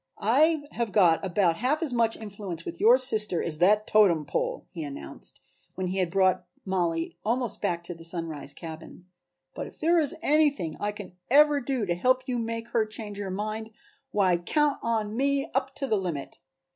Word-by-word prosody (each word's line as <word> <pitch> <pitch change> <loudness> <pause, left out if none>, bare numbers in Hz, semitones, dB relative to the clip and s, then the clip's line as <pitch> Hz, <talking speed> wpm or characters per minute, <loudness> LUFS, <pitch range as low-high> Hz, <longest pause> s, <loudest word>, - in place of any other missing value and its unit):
"I 310 +2 +4
have 235 -3 -2
got 175 -5 +4
about 180 -3 +2
half 290 +8 0
as 285 -6 -1
much 230 -2 +2
influence 200 -6 -6
with 170 - -6
your 235 +4 +7
sister 215 -8 0
as 155 -2 -1
that 210 +4 +4
totem 190 -9 +4
pole," 145 - -2
he 165 - -5
announced, 140 - -7 0.4
when 185 -1 -2
he 190 +1 -2
had 180 -2 +1
brought 185 -1 +2 0.2
Mollie 170 -4 -1
almost 240 0 -1
back 170 -1 -1
to 175 - -5
the 165 -1 -13
Sunrise 165 -4 -4
cabin, 160 +2 -10 0.5
"but - - -5
if - - -14
there 335 +2 +4
is 295 -4 0
anything 290 - +2
I 205 - -1
can 205 -3 -10 0.2
ever 295 +2 +5
do 255 -4 -1
to 175 - 0
help 255 +9 +2
you 250 -2 -1
make 230 0 -4
her 230 - +2
change 215 -2 -6
her 200 -2 -4
mind, 215 +3 -4 0.4
why 190 -7 +2
count 290 - +1
on 220 -2 -1
me 275 +2 0
up 270 +1 -1
to 275 - -1
the 220 -5 +1
limit. 170 -7 -4
210 Hz, 190 wpm, -27 LUFS, 175-255 Hz, 0.5 s, your